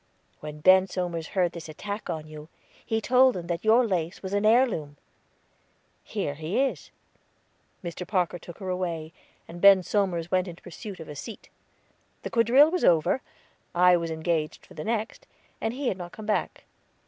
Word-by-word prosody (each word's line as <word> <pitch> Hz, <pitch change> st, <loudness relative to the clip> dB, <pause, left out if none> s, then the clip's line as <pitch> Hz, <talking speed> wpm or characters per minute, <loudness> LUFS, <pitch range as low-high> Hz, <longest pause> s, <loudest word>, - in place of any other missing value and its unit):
When 150 Hz, 0 st, -8 dB
Ben 185 Hz, +3 st, +6 dB
Somers 175 Hz, -4 st, -3 dB
heard 180 Hz, -2 st, +3 dB
this 170 Hz, -2 st, -9 dB
attack 205 Hz, +7 st, -6 dB
on 160 Hz, -3 st, -3 dB
you, 155 Hz, 0 st, -11 dB, 0.3 s
he 225 Hz, -1 st, -1 dB
told 255 Hz, +2 st, +4 dB
them 175 Hz, -2 st, -5 dB
that 170 Hz, 0 st, -3 dB
your 230 Hz, +3 st, +5 dB
lace 180 Hz, -4 st, -2 dB
was 190 Hz, +1 st, -5 dB
an 205 Hz, +1 st, +2 dB
heirloom. 215 Hz, -, +2 dB, 1.1 s
Here 145 Hz, -, -3 dB
he 155 Hz, -, -2 dB
is." 275 Hz, 0 st, -1 dB, 0.9 s
Mr. 175 Hz, +1 st, -6 dB
Parker 180 Hz, -3 st, 0 dB
took 170 Hz, 0 st, -11 dB
her 190 Hz, -2 st, -6 dB
away, 170 Hz, -3 st, -3 dB, 0.3 s
and 175 Hz, +1 st, -10 dB
Ben 195 Hz, -2 st, +8 dB
Somers 175 Hz, -4 st, -1 dB
went 185 Hz, 0 st, +2 dB
in 175 Hz, -, -7 dB
pursuit 200 Hz, +2 st, -9 dB
of 160 Hz, -, -9 dB
a 150 Hz, -, -8 dB
seat. 215 Hz, +9 st, -9 dB, 0.7 s
The -, -, -5 dB
quadrille 255 Hz, +6 st, +5 dB
was 365 Hz, -, -1 dB
over, 170 Hz, +9 st, +3 dB, 0.5 s
I 180 Hz, 0 st, +6 dB
was 170 Hz, -1 st, -2 dB
engaged 160 Hz, -1 st, -2 dB
for -, -, -16 dB
the 155 Hz, -, -6 dB
next, 225 Hz, 0 st, -3 dB, 0.3 s
and 225 Hz, -, 0 dB
he 260 Hz, +1 st, -2 dB
had 190 Hz, -, -4 dB
not 175 Hz, -1 st, -8 dB
come 215 Hz, -, -9 dB
back. 210 Hz, -1 st, -1 dB
180 Hz, 175 wpm, -26 LUFS, 165-215 Hz, 1.1 s, Ben